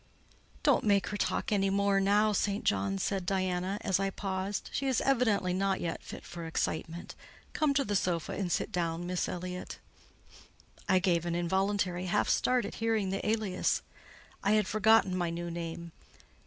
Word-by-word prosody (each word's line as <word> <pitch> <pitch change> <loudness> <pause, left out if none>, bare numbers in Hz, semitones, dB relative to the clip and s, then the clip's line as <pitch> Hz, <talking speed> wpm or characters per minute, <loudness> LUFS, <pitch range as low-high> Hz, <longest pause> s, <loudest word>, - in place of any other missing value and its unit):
"Don't - - +4
make 200 -3 +2
her 210 - -3
talk 205 - -1
any 195 -2 +2
more 200 0 +2
now, 205 +2 +3
St. 200 +1 0
John," 95 0 +1
said 195 - -1
Diana, 185 +1 -1
as 190 -1 +1
I 195 0 +1
paused; 195 0 -3
"she 275 - -1
is 260 -3 +2
evidently 225 -9 +2
not 195 +1 +1
yet 165 -1 -3
fit - - -9
for 170 -1 -7
excitement. 160 +1 -3 0.4
Come 295 -3 +1
to 275 -1 +2
the 205 - -1
sofa 175 -4 0
and 185 -3 -2
sit - - 0
down 170 -1 -1
now, - - -5
Miss 180 0 -1
Elliott." 180 0 -5 1.1
I 185 - +5
gave 175 -2 +1
an 170 - -1
involuntary 185 +1 0
half 205 +3 +1
start 250 -3 +2
at - - -6
hearing 220 -4 +1
the 195 - -2
alias: 215 -4 0 0.6
I 200 +1 +3
had 215 -1 +3
forgotten 215 -2 +4
my 175 -2 0
new 170 +1 -4
name. 170 0 -5
190 Hz, 175 wpm, -31 LUFS, 175-205 Hz, 1.1 s, I